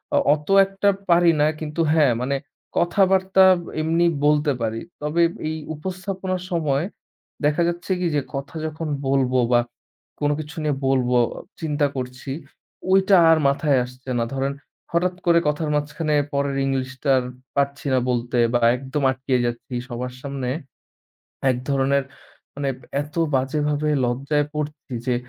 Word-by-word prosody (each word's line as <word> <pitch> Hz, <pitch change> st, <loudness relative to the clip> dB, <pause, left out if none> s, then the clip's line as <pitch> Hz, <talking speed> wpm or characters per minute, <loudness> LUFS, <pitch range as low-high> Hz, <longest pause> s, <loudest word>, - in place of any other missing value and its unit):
অ -, -, +5 dB, 0.2 s
অত 150 Hz, 0 st, -4 dB, 0.2 s
একটা 195 Hz, +1 st, +1 dB, 0.2 s
পারি 170 Hz, 0 st, +6 dB
না, 150 Hz, -, +5 dB
কিন্তু 155 Hz, +1 st, -3 dB
হ্যাঁ, 150 Hz, -6 st, +4 dB
মানে 135 Hz, +2 st, 0 dB, 0.4 s
কথাবার্তা 190 Hz, +1 st, +4 dB, 0.4 s
এমনি 165 Hz, +2 st, +2 dB, 0.2 s
বলতে 150 Hz, 0 st, +3 dB
পারি। 115 Hz, 0 st, -2 dB, 0.2 s
তবে, 150 Hz, +3 st, 0 dB, 0.3 s
এই 155 Hz, -, -2 dB, 0.2 s
উপস্থাপনার 185 Hz, +2 st, -4 dB
সময় 155 Hz, -3 st, +1 dB, 0.6 s
দেখা 150 Hz, +3 st, +2 dB
যাচ্ছে 175 Hz, +2 st, -3 dB
কি 180 Hz, -, 0 dB
যে, 145 Hz, -, +2 dB
কথা 140 Hz, +4 st, -6 dB
যখন 155 Hz, +1 st, -4 dB, 0.2 s
বলব 135 Hz, -2 st, +2 dB, 0.2 s
বা 120 Hz, -1 st, +5 dB, 0.6 s
কোনো 145 Hz, 0 st, +2 dB
কিছু 150 Hz, 0 st, -7 dB
নিয়ে 150 Hz, -2 st, +1 dB
বলবো, 125 Hz, -2 st, +2 dB, 0.4 s
চিন্তা 150 Hz, -2 st, +1 dB
করছি, 130 Hz, +1 st, -5 dB, 0.6 s
ঐটা 190 Hz, 0 st, +5 dB
আর 160 Hz, -, +6 dB
মাথায় 140 Hz, 0 st, +2 dB
আসছে 130 Hz, +1 st, -12 dB
না। 115 Hz, -, +1 dB
ধরেন 135 Hz, +1 st, -1 dB, 0.4 s
হঠাৎ 180 Hz, +2 st, +1 dB
করে 170 Hz, -1 st, +5 dB
কথার 150 Hz, +1 st, 0 dB
মাঝখানে 150 Hz, +1 st, -1 dB, 0.2 s
পরের 140 Hz, 0 st, 0 dB
ইংলিশটা 135 Hz, +1 st, 0 dB, 0.4 s
পাচ্ছি 140 Hz, +1 st, -1 dB
না 130 Hz, -, +4 dB
বলতে 120 Hz, 0 st, -1 dB, 0.2 s
বা 120 Hz, -, +3 dB, 0.2 s
একদম 135 Hz, +3 st, -3 dB
আটকিয়ে 130 Hz, -1 st, 0 dB
যাচ্ছি 120 Hz, +2 st, -4 dB, 0.2 s
সবার 125 Hz, +1 st, -4 dB
সামনে। 135 Hz, -2 st, -4 dB, 1.0 s
এক 125 Hz, -, +1 dB
ধরনের 140 Hz, 0 st, +2 dB, 0.5 s
মানে, 140 Hz, -1 st, -1 dB, 0.3 s
এত 150 Hz, +1 st, -13 dB, 0.2 s
বাজেভাবে 145 Hz, +3 st, 0 dB, 0.2 s
লজ্জায় 140 Hz, +4 st, 0 dB
পড়ছি 150 Hz, -3 st, -5 dB
যে, 125 Hz, -, +2 dB
145 Hz, 140 wpm, -23 LUFS, 135-160 Hz, 1.0 s, পারি